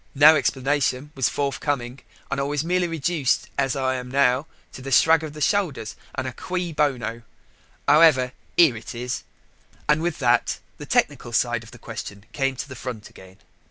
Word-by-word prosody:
no 155 +3 +8
explanation 140 0 0
was 130 -3 +1
forthcoming. 140 -2 -2 0.3
And 140 - -1
I - - +1
was 145 +1 -1
merely 180 +1 +1
reduced, 165 -3 0
as 135 -1 0
I 130 -1 0
am 125 0 -7
now, 135 +2 +2 0.2
to - - -10
a - - -4
shrug 160 +3 +5
of 155 -2 -6
the 150 - -9
shoulders, 150 - 0 0.2
and 130 - -2
a 130 - -4
cui 180 +1 -3
bono. 125 -6 -1 0.7
However, 145 -4 +6 0.3
here 160 -8 +6
it 110 +2 -8
is," 125 +1 -3 0.7
and 150 +1 +3
with 170 -1 -1
that 120 -3 +2 0.2
the - - -8
technical 120 - +1
side 120 0 +1
of 115 - -13
the 120 - -13
question 105 -3 -8
came 135 0 -1
to 130 - -5
the 130 - -9
front 120 -3 -7
again. 95 0 -15
135 Hz, 180 wpm, -24 LUFS, 125-150 Hz, 0.7 s, no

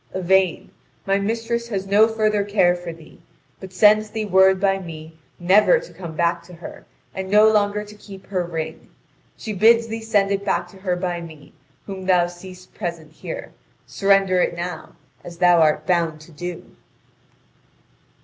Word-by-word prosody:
Yvain, 185 -1 +1 0.3
my 195 0 +1
mistress 230 +3 -2
has 195 -4 -3
no 205 +3 +4
further 215 -2 0
care 200 -3 +2
for 175 -1 -7
thee, 165 -1 -16 0.4
but 190 -1 -10
sends 215 +3 +4
thee 215 0 -4
word 190 -1 +4
by 195 0 +1
me 160 -3 -10 0.2
never 200 - +4
to - - -13
come 170 -4 -9
back 170 +1 0
to 175 +1 -14
her, 170 - -11 0.3
and 190 0 -5
no 210 +2 +6
longer 210 -1 +1
to 210 0 -13
keep 200 -2 -13
her 185 -3 -2
ring. 165 -2 -6 0.5
She 215 - -6
bids 230 +4 +4
thee 225 0 -6
send 205 -3 +1
it 200 0 -1
back 180 -3 -1
to 190 - -16
her 190 -2 -2
by 175 -1 -3
me, 155 -3 -13 0.3
whom 190 -2 -7
thou 180 -2 +4
seest 180 +1 -12
present 170 -5 -6
here. - - -8 0.3
Surrender 195 -2 +2
it - - 0
now, 175 -1 -6 0.3
as 170 -1 -10
thou 175 -1 +4
art 155 -1 +2
bound 170 -3 0
to 155 - -15
do." 175 +2 -8
190 Hz, 170 wpm, -21 LUFS, 175-210 Hz, 0.5 s, no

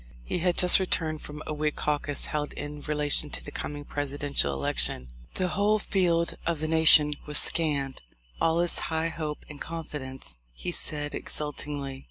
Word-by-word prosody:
He 120 - -2
had 175 0 +1
just 180 +1 +7
returned 160 -4 0
from 150 +1 -8
a - - -3
Whig 150 0 -1
caucus 145 -1 0
held 150 -1 -3
in 145 0 -7
relation 150 0 +1
to - - -3
the 145 - -9
coming 145 0 -6
Presidential 145 - -1
election. 65 -2 0 0.3
"The 185 - 0
whole 205 +5 +2
field 175 -5 +1
of 170 -2 -1
the 155 - -2
nation 155 -2 +6
was 150 - +1
scanned; 145 -5 +1 0.4
all 165 +1 +3
is 175 - +4
high 160 0 0
hope 155 -2 -5
and 150 -1 -11
confidence," 135 - -7
he 175 - -5
said 145 -3 -1
exultingly. 145 -2 -3
150 Hz, 165 wpm, -27 LUFS, 145-165 Hz, 0.4 s, just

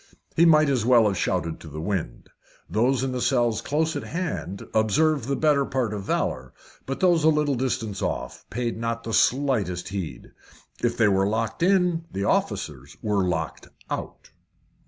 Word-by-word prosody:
He 170 - +5
might 155 -2 +6
as 130 -5 +1
well 120 -1 +5
have 100 -2 +1
shouted 80 -1 -1
to - - -11
the 75 0 -7
wind. 85 -8 -4 0.4
Those 125 +5 +1
in 135 - -1
the 125 -1 -3
cells 120 -4 +2
just - - -20
close 160 +2 +1
at - - -2
hand 170 - -4
observed 125 +6 +2
the 140 +2 -1
better 150 -2 +3
part 130 -5 -1
of 105 - -4
valour, 65 -8 -2 0.3
but 135 - -4
those 175 -4 +4
a 160 - +6
little 150 -2 +2
distance 115 -5 -2
off - - -3
paid 120 0 -3
not 115 0 -2
the 115 - -5
slightest 110 -11 +1
heed. 95 -5 -6 0.5
If 120 0 +1
they 110 - +4
were 95 -1 +3
locked 115 +3 -2
in, 180 -2 +2
the 100 - -3
officers 70 -7 -2
were 105 -3 +1
locked 80 -3 -3 0.2
out. - - -6
115 Hz, 175 wpm, -25 LUFS, 100-145 Hz, 0.5 s, might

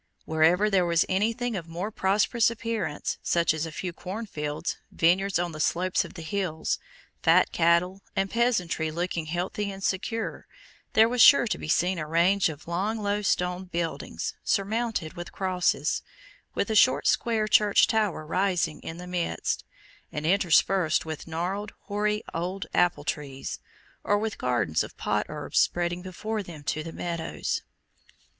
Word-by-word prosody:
Wherever 160 +6 +3
there 195 -3 +3
was 170 -1 +3
anything 225 +5 0
of 170 -4 -5
more 175 +6 -4
prosperous 210 +4 +2
appearance, 225 -9 -3
such 170 -2 +2
as 160 +1 -2
a - - -7
few 175 +2 -4
cornfields, 175 -6 -4
vineyards 190 +4 +2
on 175 0 -1
the 155 - -8
slopes 180 +4 +1
of - - -11
the 165 - -7
hills, 170 -3 -2 0.4
fat - - +4
cattle, 175 +3 +2
and 195 - +1
peasantry 210 -9 +1
looking 170 0 -3
healthy 185 +5 -2
and 195 0 -9
secure, 220 +5 -2 0.5
there 220 +1 +6
was 245 0 +1
sure 280 -1 +8
to 220 - -1
be - - -6
seen 175 +3 +2
a 155 - -4
range 175 +4 +3
of 155 0 -9
long 195 +6 -1
low 205 -1 -1
stone 180 -1 0
buildings, 170 -2 -3
surmounted 210 -4 -1
with 175 0 -7
crosses, 185 -2 0 0.5
with 200 - 0
a - - 0
short 250 +4 +5
square 225 -2 +2
Church 210 -1 +5
tower 210 -8 0
rising 180 -2 0
in 160 - -7
the 180 - -8
midst, 180 -1 -2 0.5
and 150 +1 -4
interspersed 180 -2 +3
with 155 -1 -6
gnarled 185 +6 -3
hoary 210 +1 -1
old 180 +3 -3
apple 175 -4 +2
trees, 145 -2 -4 0.4
or 205 - +2
with 215 0 -3
gardens 120 -11 +1
of - - -10
pot - - -1
herbs - - -1
spreading 175 0 +1
before 210 +4 -4
them 170 -6 -10
to 155 +2 -1
the 165 +1 -7
meadows. 170 -1 -3
180 Hz, 155 wpm, -27 LUFS, 165-205 Hz, 0.5 s, sure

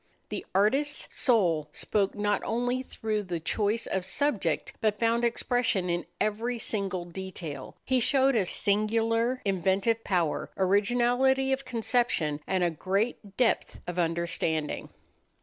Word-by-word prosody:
The - - -4
artist's 275 +9 +1
soul 175 - +2
spoke 200 -2 0
not 205 -1 0
only 245 +2 0
through 220 -4 -3
the 180 -4 -4
choice 210 +7 0
of 190 - -2
subject, 200 - 0
but 210 -2 +1
found 230 +1 +2
expression 235 -6 +1
in 175 0 -2
every 230 +3 -1
single 195 -5 -1
detail. 175 -4 -7
He 260 -1 +2
showed 270 +2 +3
a 200 -5 +2
singular 230 +5 +1
inventive 195 +4 +1
power, 175 -6 0
originality 245 +7 +3
of 270 0 -3
conception, 230 - 0
and 185 -1 +1
a 175 - +2
great 195 +4 -2
depth 245 -3 +1
of 175 0 -4
understanding. 165 -2 -1
210 Hz, 130 wpm, -28 LUFS, 185-240 Hz, -, showed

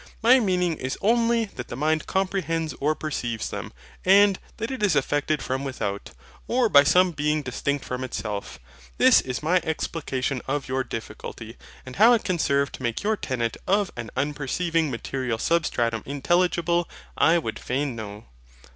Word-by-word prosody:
My 250 +3 +7
meaning 180 -6 +1
is 130 0 -4
only 230 +1 +2
that 125 - -8
the - - -6
mind 155 +3 0
comprehends 180 -4 -1
or 150 +2 +1
perceives 120 -8 -3
them; - - -5 0.3
and 200 +1 +5 0.2
that 225 +3 -3
it 260 - -5
is 200 -7 +3
affected 145 +2 0
from 130 +1 -2
without, 105 -7 -4 0.4
or 240 -1 +2
by 140 -5 +7
some 180 +5 +4
being 150 0 0
distinct 140 +2 -2
from 125 0 -4
itself. 105 -5 -5 0.4
This - - +6
is 125 +2 -5
my 175 +4 +3
explication 145 -5 -2
of 135 0 -2
your 130 +1 -1
difficulty; 115 - -7 0.3
and 130 - -9
how 225 +5 +7
it 230 - +2
can 180 -3 -1
serve 140 -2 +1
to - - -9
make 120 - -2
your 215 +1 +2
tenet 120 - -2
of 200 0 +2
an 120 -2 -6
unperceiving 150 +3 0
material 125 -1 -3
SUBSTRATUM 120 -7 0
intelligible, 170 +4 +1 0.3
I 165 +2 +4
would 115 -10 -3
fain 135 0 -2
know. 105 0 -8
150 Hz, 165 wpm, -25 LUFS, 130-180 Hz, 0.4 s, My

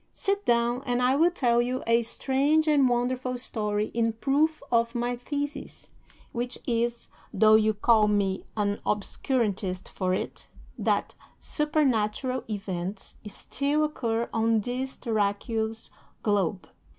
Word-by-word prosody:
Sit 400 +1 -1
down, 240 +1 +2
and 245 0 +1
I 250 +1 +3
will 330 +4 +5
tell 240 -9 +2
you 250 +2 -2
a 230 +1 +4
strange 280 +6 +1
and 285 -4 +4
wonderful 250 +1 -1
story 210 -3 -1
in 230 -1 +1
proof 280 +7 +1
of 230 0 +2
my 240 +1 -1
thesis, 285 +4 -5 0.4
which 245 +1 -3
is, 235 0 -1 0.2
though 215 +2 +5
you 220 0 +4
call 215 0 +4
me 200 -2 0
an 205 -1 0
obscurantist 205 -3 -1
for 185 -1 -2
it, - - -5 0.3
that - - 0 0.3
supernatural 260 -5 0
events 195 -2 -5
still 280 +8 -1
occur 235 -6 -1
on 225 0 +2
this 255 +4 -4
terraqueous 220 0 -1 0.3
globe. 195 -4 0
235 Hz, 125 wpm, -27 LUFS, 215-260 Hz, 0.4 s, will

